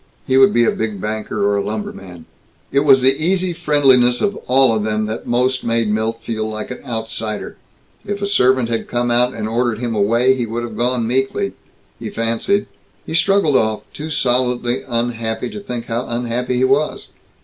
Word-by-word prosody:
He 130 - +1
would 135 0 +6
be 120 0 +3
a - - +3
big 110 -3 -3
banker, 110 0 -2
or 100 0 +2
a 100 - 0
lumberman. 95 -5 -6 0.5
It 140 - +3
was 135 -3 +5
the 135 +3 +3
easy 185 +1 +1
friendliness 130 -6 +3
of 205 -1 0
all 130 -2 +4
of 110 - -1
them 110 0 -1
that 110 +2 -5
most 125 +2 +1
made 115 -2 0
Milt 110 +2 -2
feel 110 -1 -3
like 110 +2 -5
an 125 - -8
outsider. 110 -3 -4 0.5
If 205 0 -4
a 200 - -2
servant 130 - +3
had 115 -1 -2
come 120 0 -1
out 125 +1 +2
and 110 -1 -3
ordered 115 0 0
him 120 0 -3
away, 115 +5 +3
he 125 -3 -2
would 115 +2 -3
have 115 -2 -6
gone 120 0 0
meekly... 135 - -1 0.5
he - - -5
fancied. 115 - 0 0.4
He - - -6
straggled 170 -3 +3
off, 110 -3 +1
too 155 +2 -6
solidly 125 -3 0
unhappy 115 -1 -2
to - - -6
think 125 - -5
how 115 +2 -3
unhappy 120 +1 -2
he 125 - +2
was. 140 +4 +1
120 Hz, 190 wpm, -18 LUFS, 110-130 Hz, 0.5 s, would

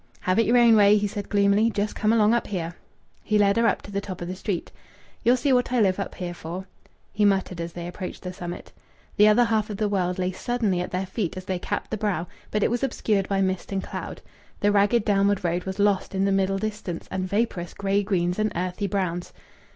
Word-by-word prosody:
"Have 185 +3 +1
it 230 - +3
your 240 +2 +4
own 235 -2 +6
way!" 205 0 +6
he 205 - 0
said 205 0 -5
gloomily. 205 +2 +3
"Just 210 -1 -2
come 215 +1 +1
along 220 -1 +4
up 235 - 0
here." 175 -4 -3 0.5
He 215 - +1
led 200 0 +3
her 230 0 +4
up - - 0
to 200 - -10
the 200 0 -2
top 185 -3 -7
of 175 - -5
the 185 - -4
street. 185 -2 -3 0.5
"Ye'll 245 +2 +4
see 265 +2 +2
what 245 -1 +2
I 250 - +2
live 195 -3 +2
up 200 - -4
here 175 -1 -4
for," 175 +3 -7 0.5
he 210 - +1
muttered 190 -3 +1
as 170 0 -5
they 170 -1 -6
approached 180 +1 -7
the 180 0 -5
summit. 175 -1 -7 0.5
The 210 0 +7
other 215 +3 +5
half 220 -2 0
of 205 - -4
the 215 - +1
world 180 -3 0
lay 185 0 0
suddenly 210 -1 -1
at 180 - -4
their 185 +1 -2
feet 185 -2 -3
as 185 - -7
they 185 -2 -2
capped 205 - -4
the 220 - -1
brow, 200 -6 -1 0.2
but 210 -1 0
it - - +2
was 240 - 0
obscured 210 -7 0
by 195 -1 +1
mist 190 0 -1
and 195 -1 -1
cloud. - - -7 0.4
The 205 - +3
ragged 205 +2 +3
downward 200 -1 +2
road 175 +1 -1
was 190 0 -4
lost 200 -1 +1
in 190 +1 +2
the 200 - +2
middle 195 0 +1
distance 210 -4 -4
amid 185 0 -2
vaporous 200 -5 -1
grey 200 0 +1
greens 180 -2 0
and 215 0 +1
earthy 180 +3 -2
browns. 180 -3 -2
200 Hz, 240 wpm, -25 LUFS, 185-210 Hz, 0.5 s, The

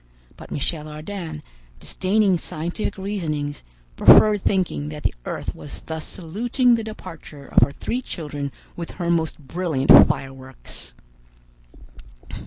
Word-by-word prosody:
But - - -12
Michel 150 +1 -2
Ardan, 155 0 -6 0.4
disdaining 190 - +1
scientific 170 +9 -4
reasonings, 155 -8 -3 0.3
preferred 210 - +7
thinking 185 -7 0
that 150 0 -8
the - - +1
earth - - -4
was 145 - -9
thus 160 -1 -6
saluting 235 - +1
the 230 -1 +1
departure 165 -9 -9
of - - +3
her 120 - +5
three 245 - -3
children 145 - -5 0.2
with 170 -1 -6
her 170 -2 0
most 165 -2 0
brilliant 155 -2 0 0.2
fireworks. 130 - -6
160 Hz, 120 wpm, -23 LUFS, 145-195 Hz, 0.4 s, preferred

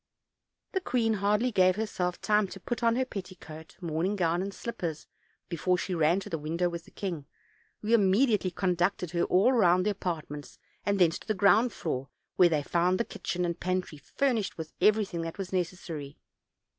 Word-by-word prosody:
The 380 - -1
queen 235 -9 +1
hardly 210 +4 +1
gave 185 -3 +4
herself 185 -5 -2
time 210 -1 +2
to 190 +1 -9
put 240 +6 -4
on 230 -1 +3
her 260 +1 +1
petticoat, 180 -7 -9
morning 170 +4 -1
gown 175 -2 +1
and 195 +1 -3
slippers 180 -7 -5 0.4
before 180 +1 0
she 180 +1 -3
ran 165 +2 +3
to - - -8
the 165 - -2
window 165 +4 -1
with 170 -1 -6
the - - -16
king, 170 -8 -5 0.6
who 220 +2 +1
immediately 210 -1 +4
conducted 180 -1 0
her 170 -1 +1
all 200 +8 +4
round 185 -5 +4
the 210 - +2
apartments 155 -7 -5 0.3
and 200 0 +2
thence 175 -3 +3
to - - -16
the 215 - 0
ground 215 +5 +4
floor, 135 -7 -4 0.3
where 180 -1 +6
they 155 -3 0
found 180 +4 +1
the 235 - +1
kitchen 180 0 -3
and 170 0 -3
pantry 185 -4 -2
furnished 230 - -1
with 160 -1 -7
everything 205 -3 +3
that 165 0 -5
was 195 -1 -5
necessary. 170 -5 -4
185 Hz, 180 wpm, -29 LUFS, 170-210 Hz, 0.6 s, where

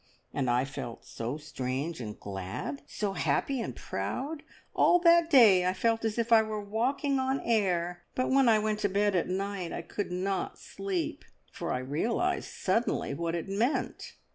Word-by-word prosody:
And 130 -3 0
I 125 +2 +2
felt 120 -4 -7
so 120 +5 -4
strange 140 0 -4
and 105 -2 -7
glad, 100 +8 -5
so 205 -2 -2
happy 270 +5 0
and 130 - -4
proud; 265 - -4 0.3
all 355 - +5
that 340 -1 +6
day 220 - +7
I 180 +1 +1
felt 225 +4 +1
as 220 0 -1
if 235 0 -1
I 225 - +8
were 215 -1 -3
walking 255 +7 0
on 265 +1 0
air, 180 -6 0
but 255 - 0
when 270 -2 +5
I 220 - +6
went 215 0 0
to 205 - +1
bed 200 +1 +2
at 175 - +1
night 190 -1 -3
I - - -4
could 200 +2 -4
not 190 +2 -2
sleep, 195 -3 -4 0.3
for - - -4
I - - 0
realised 230 - -1
suddenly 195 -6 0
what 170 +3 -2
it 170 - -4
meant. 220 +8 -1
195 Hz, 175 wpm, -29 LUFS, 165-230 Hz, 0.3 s, I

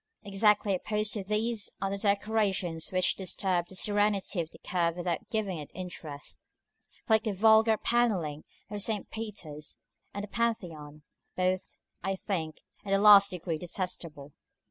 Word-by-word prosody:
Exactly 205 0 +3
opposed 210 +3 -1
to 205 - -3
these 215 +1 -1
are 195 +1 -1
the 200 - -2
decorations 200 -5 0
which 185 -1 +3
disturb 185 -2 -1
the 190 - -10
serenity 205 -2 +2
of 160 - -6
the - - -15
curve 170 -2 -1
without 175 -1 -3
giving 210 -7 -1
it 145 - -8
interest, 160 -6 -7 0.7
like 220 -2 +5
the 215 - -1
vulgar 220 +2 +5
panelling 195 -12 0 0.3
of 205 -1 -2
St. 210 -1 -1
Peter's 180 -9 -6 0.3
and 200 - -5
the - - -5
Pantheon; 165 -11 -3 0.3
both, 185 0 -1 0.3
I 195 0 -1
think, 165 -6 -4 0.2
in 195 - -2
the - - +5
last 200 -1 +8
degree 170 -3 -3
detestable. 170 -5 -5
195 Hz, 145 wpm, -30 LUFS, 175-210 Hz, 0.7 s, last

